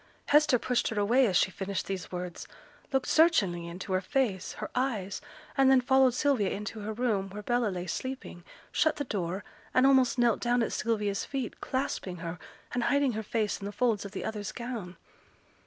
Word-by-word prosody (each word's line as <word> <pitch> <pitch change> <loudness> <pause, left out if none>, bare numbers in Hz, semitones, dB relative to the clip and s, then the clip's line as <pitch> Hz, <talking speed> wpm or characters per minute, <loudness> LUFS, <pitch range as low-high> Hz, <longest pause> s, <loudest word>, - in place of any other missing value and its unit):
Hester 295 -3 +5
pushed 250 +1 0
her 220 - -1
away 240 +5 +4
as 185 -4 +3
she 190 - +3
finished 195 0 -3
these 190 -2 -5
words; 180 -1 -5 0.4
looked 265 -2 +1
searchingly 200 - +3
into 185 +3 -5
her 185 - +2
face, 200 -4 -1
her - - -6
eyes, 230 -7 -1 0.3
and 270 -1 +5
then 265 -1 +7
followed 260 0 +4
Sylvia 250 -9 +2
into 210 +2 -5
her 210 +1 -4
room, 215 -4 0
where 210 +2 -7
Bella 240 +1 +1
lay 180 -3 -3
sleeping, 255 -2 -5 0.3
shut 315 0 +2
the 290 - -2
door, 190 -5 -3 0.3
and 255 - +6
almost 265 -2 +4
knelt 240 -3 +3
down 240 0 +2
at - - -2
Sylvia's 210 -3 0
feet, 265 -4 -4
clasping 230 -8 -2
her, 170 0 -6 0.3
and 245 -1 0
hiding 280 -2 +3
her 220 -1 -3
face 215 0 -1
in 200 - -7
the 205 - -3
folds 220 -1 +1
of 200 - -7
the 195 - -5
other's 210 -2 -4
gown. 230 -8 -6
220 Hz, 190 wpm, -29 LUFS, 195-255 Hz, 0.4 s, then